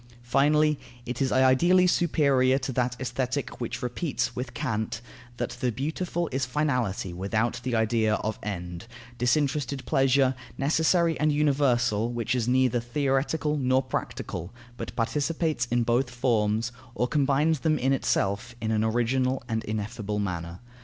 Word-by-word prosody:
Finally, 150 +4 +3 0.3
it 125 +1 -4
is 135 - +1
ideally 130 +8 +5
superior 140 -7 +3
to 135 0 -3
that 125 -1 0
Aesthetic 130 +2 -3
which 120 - -4
repeats 125 0 -2
with 125 +2 -5
Kant, 115 -6 -2 0.4
that - - -2
the 125 -3 -1
beautiful 160 - -2
is 135 +1 -1
finality 125 -9 -1
without 110 +6 -1
the 125 -1 -2
idea 110 -1 +2
of 110 0 -3
end, 90 -1 -5 0.3
disinterested 135 +1 0
pleasure, 135 0 +3 0.2
necessary 160 +3 +2
and 150 +1 +3
universal, 125 -7 +2
which 120 0 -1
is 120 -2 0
neither 125 -1 +3
theoretical 140 +4 0
nor 130 -1 +2
practical, 90 -7 -4 0.2
but - - -7
participates 150 +2 0
in 120 0 +1
both 120 +2 +1
forms, 115 -3 0 0.2
or 125 +3 +1
combines 145 +3 +2
them 155 0 +1
in 135 0 +1
itself 100 -3 0
in 110 -1 -2
an 110 0 +1
original 125 +3 +1
and 110 -1 -2
ineffable 105 0 -3
manner. 85 -3 -4
125 Hz, 140 wpm, -27 LUFS, 115-140 Hz, 0.4 s, ideally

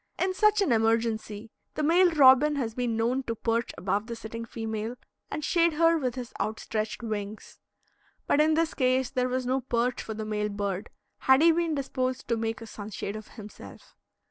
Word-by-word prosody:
In 370 0 0
such 425 +1 +3
an 305 - 0
emergency 225 -1 0 0.2
the 305 - -1
male 350 +4 +5
robin 295 -1 +6
has 235 -5 -2
been 240 -2 -1
known 240 +4 +1
to 230 - -3
perch 230 +1 -1
above 200 +4 -1
the 235 - -5
sitting 230 +1 -7
female 225 0 -4 0.3
and 305 - -4
shade 340 -2 +3
her 330 +2 +4
with 260 -6 -1
his 250 -2 -7
outstretched 215 +2 -3
wings. 215 -1 -6 0.7
But 290 - +3
in 310 +1 +3
this 330 0 +1
case 255 -1 +1
there 255 -1 0
was 255 0 -1
no 260 +2 0
perch 245 0 -1
for 220 - -6
the 215 0 -5
male 210 0 -1
bird, 200 0 -3 0.3
had 265 +3 +5
he 335 - +7
been 330 -1 0
disposed 260 -2 -2
to 235 - +2
make 225 0 -3
a - - -7
sunshade 205 -1 -6
of 215 0 -8
himself. 210 -1 -12
235 Hz, 190 wpm, -27 LUFS, 220-280 Hz, 0.7 s, he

